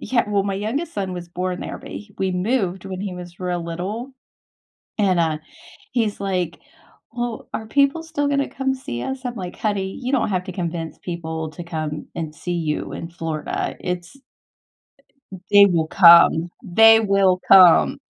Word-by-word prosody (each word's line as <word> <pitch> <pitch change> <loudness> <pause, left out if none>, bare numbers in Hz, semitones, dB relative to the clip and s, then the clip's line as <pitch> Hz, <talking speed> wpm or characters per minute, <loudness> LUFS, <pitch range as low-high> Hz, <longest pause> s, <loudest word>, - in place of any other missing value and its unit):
yeah 245 -2 +1
well, 200 -1 +1
my 200 -1 -2
youngest 250 - -3
son 190 -2 -3
was 175 -1 -7
born 180 +1 -3
there, - - -5
but - - -12
h 210 - -9
we 190 -1 0
moved 190 -1 -1
when 190 -1 -6
he 195 -2 -4
was 175 0 -10
real 175 -2 -2
little. 200 +10 -5 0.8
And, 195 -4 +2
uh, 160 -2 +1 0.6
he's 225 -4 0
like, 180 -4 -2 0.5
"Well, 240 -1 -4
are 220 - -4
people 280 +6 +2
still 320 -3 -2
gonna 280 -1 0
come 265 0 -2
see 120 - -6
us?" 265 0 -5
I'm 245 - -4
like, 180 -5 -7
"Honey, 195 -3 -2
you 255 +1 -3
don't 265 - +2
have 185 -2 -1
to 185 - -7
convince 170 -2 -4
people 160 -2 -5
to 175 - -9
come 155 -2 -5
and 160 -2 -5
see 175 +3 -5
you 155 -3 -2
in 165 - -6
Florida, 165 -3 -4
it's" 180 +6 -5 1.2
Uh - - -6
eh - - -16
"they 205 0 +8
will 170 -4 +1
come. 170 -1 +7
They 225 +4 +6
will 195 -3 +2
come." 185 -3 +7
185 Hz, 180 wpm, -21 LUFS, 170-220 Hz, 1.2 s, they